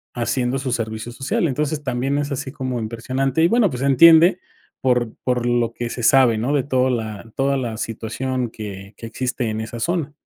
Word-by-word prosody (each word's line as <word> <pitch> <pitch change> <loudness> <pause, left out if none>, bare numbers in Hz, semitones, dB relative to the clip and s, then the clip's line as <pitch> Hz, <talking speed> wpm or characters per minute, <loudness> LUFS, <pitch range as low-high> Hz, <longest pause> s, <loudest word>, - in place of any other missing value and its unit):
haciendo 125 +1 0
su 130 -1 -3
servicio 110 -1 -3
social. 135 +7 -1
Entonces, 150 +2 -2
también 130 +2 -1
es 145 0 -2
así 130 0 -4
como 130 -4 -3
impresionante, 130 +6 -1
y - - +6
bueno, 230 0 +3
pues, 125 -3 -5
se - - 0
entiende 165 +6 +7 0.4
por 125 -3 +1
por 125 -2 0
lo 120 -1 +1
que 120 -1 -4
se 125 - -5
sabe, 120 -2 +5
¿no?, 125 +6 0
de 140 -3 +2
toda 130 -1 +1
la 110 -2 -4
toda 140 +1 +1
la 120 -4 -3
situación 120 +3 -3
que 100 -2 -8
que 115 - -9
existe 125 -1 -2
en 110 0 -3
esa 115 +1 -6
zona. 165 0 -1
125 Hz, 200 wpm, -21 LUFS, 115-135 Hz, 0.4 s, entiende